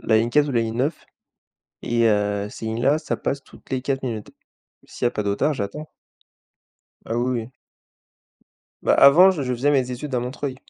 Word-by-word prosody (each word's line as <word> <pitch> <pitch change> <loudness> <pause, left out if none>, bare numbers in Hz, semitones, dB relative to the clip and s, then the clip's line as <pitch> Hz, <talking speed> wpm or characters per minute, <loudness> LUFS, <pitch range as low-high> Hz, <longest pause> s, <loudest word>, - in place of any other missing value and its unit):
la 110 -1 +3
ligne 115 +1 +1
4 150 +2 +3
ou - - -2
la 120 - +2
ligne 115 0 -3
9, 140 +6 -2 0.8
et 115 -1 +1
heu, 105 -1 0
ces 110 - -8
lignes 110 +2 -3
là, 140 +4 +3
ça 155 - -3
passe 140 0 -3
toutes - - -19
les 130 -1 -2
4 135 0 -2
minutes. 110 -4 -5 0.5
S'il - - -5
y - - +6
a - - -1
pas 105 - -3
de 100 - -1
retards, 145 +9 +1
j'attends. 150 +7 -6 1.2
Ah 115 - -2
oui, 120 0 0
oui. 110 - -10 1.3
Bah - - +3
avant 170 +8 +7
j 160 -7 -3
je 125 -1 -1
faisais 140 +5 +1
mes 130 -3 +1
études 130 +3 -5
à 125 - +1
Montreuil 130 +1 -4
125 Hz, 210 wpm, -22 LUFS, 115-140 Hz, 1.3 s, avant